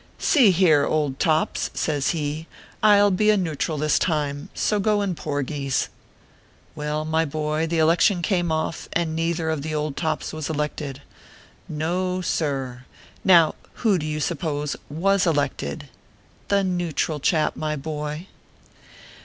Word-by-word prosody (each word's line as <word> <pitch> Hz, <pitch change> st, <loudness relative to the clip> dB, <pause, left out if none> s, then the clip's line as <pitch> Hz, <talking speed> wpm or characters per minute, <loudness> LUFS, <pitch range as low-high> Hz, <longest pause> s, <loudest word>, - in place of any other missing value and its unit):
"See 265 Hz, -, +5 dB
here, 165 Hz, -6 st, +4 dB
old 145 Hz, -3 st, 0 dB
tops," 160 Hz, -1 st, +1 dB
says 145 Hz, -3 st, 0 dB
he, 155 Hz, 0 st, -2 dB, 0.3 s
"I 210 Hz, -1 st, +6 dB
ll 205 Hz, 0 st, +5 dB
be 210 Hz, +3 st, +2 dB
a 210 Hz, -, +5 dB
neutral 160 Hz, -3 st, -2 dB
this 150 Hz, +1 st, +2 dB
time; 145 Hz, -3 st, -1 dB
so 210 Hz, -, +1 dB
go 205 Hz, 0 st, +2 dB
in 195 Hz, -2 st, -1 dB
porgies 145 Hz, -3 st, -2 dB, 0.4 s
!" -, -, -32 dB
Well, 150 Hz, 0 st, -2 dB
my 160 Hz, +1 st, +1 dB
boy, 155 Hz, +1 st, -1 dB
the 165 Hz, +1 st, -1 dB
election 170 Hz, +3 st, +3 dB
came 175 Hz, -2 st, +1 dB
off, 160 Hz, +1 st, -2 dB
and 165 Hz, -2 st, 0 dB
neither 165 Hz, 0 st, 0 dB
of 155 Hz, -3 st, -2 dB
the 155 Hz, +1 st, -3 dB
old 150 Hz, -2 st, -2 dB
tops 155 Hz, -2 st, -2 dB
was 155 Hz, -1 st, -4 dB
elected. 150 Hz, -2 st, -3 dB, 0.7 s
No, 180 Hz, +4 st, -1 dB
sir! 135 Hz, -7 st, -2 dB, 0.4 s
Now, 170 Hz, -4 st, +6 dB, 0.3 s
who 200 Hz, -5 st, +4 dB
do 155 Hz, -, -4 dB
you 155 Hz, 0 st, -2 dB
suppose 150 Hz, -2 st, -2 dB
ivas 190 Hz, +5 st, +2 dB
elected? 145 Hz, -, -1 dB, 0.6 s
The 200 Hz, -1 st, +2 dB
Neutral 175 Hz, -4 st, -1 dB
Chap, 155 Hz, +1 st, +1 dB
my 155 Hz, -1 st, -2 dB
boy 150 Hz, +2 st, -5 dB
155 Hz, 145 wpm, -23 LUFS, 150-175 Hz, 0.7 s, I